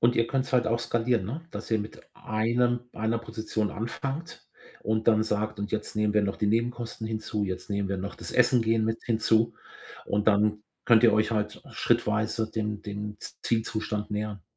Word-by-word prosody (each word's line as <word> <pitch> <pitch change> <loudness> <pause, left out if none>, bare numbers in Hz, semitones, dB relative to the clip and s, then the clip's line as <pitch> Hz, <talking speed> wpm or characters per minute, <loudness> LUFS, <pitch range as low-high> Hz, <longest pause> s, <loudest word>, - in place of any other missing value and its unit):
und 120 +1 +4
ihr 115 - +3
könnt's 130 0 -1
halt 125 -1 +3
auch 115 +1 +2
skalieren, 115 -3 +1
ne, 145 +10 -4
dass - - -7
ihr 110 - +3
mit 105 +1 -6
einem 120 +3 +1
einer 110 +1 0
Position 110 -2 -2
anfangt 135 +8 -5 0.4
und 110 +1 +1
dann 110 -1 +5
sagt: 105 -1 -1
„Und 100 +1 -4
jetzt 110 0 -3
nehmen 105 -1 +2
wir 105 - +4
noch 100 -1 -1
die 105 - 0
Nebenkosten 115 0 -1
hinzu, 110 -1 -2
jetzt 95 +1 -5
nehmen 100 -1 0
wir 95 -1 -1
noch 100 +2 -4
das - - -7
Essen 125 -1 +4
gehen 110 0 +2
mit 110 0 -1
hinzu“, 115 -1 +2 0.5
und 105 +1 +1
dann 105 0 +3 0.2
könnt 115 -1 +6
ihr 115 - +7
euch 110 +2 +3
halt 105 -1 -2
schrittweise 110 -1 +1
dem 105 -1 -2
dem 105 0 -5 0.3
Zielzustand 110 -2 -1
nähern. 105 -2 -3
110 Hz, 185 wpm, -28 LUFS, 105-115 Hz, 0.5 s, ihr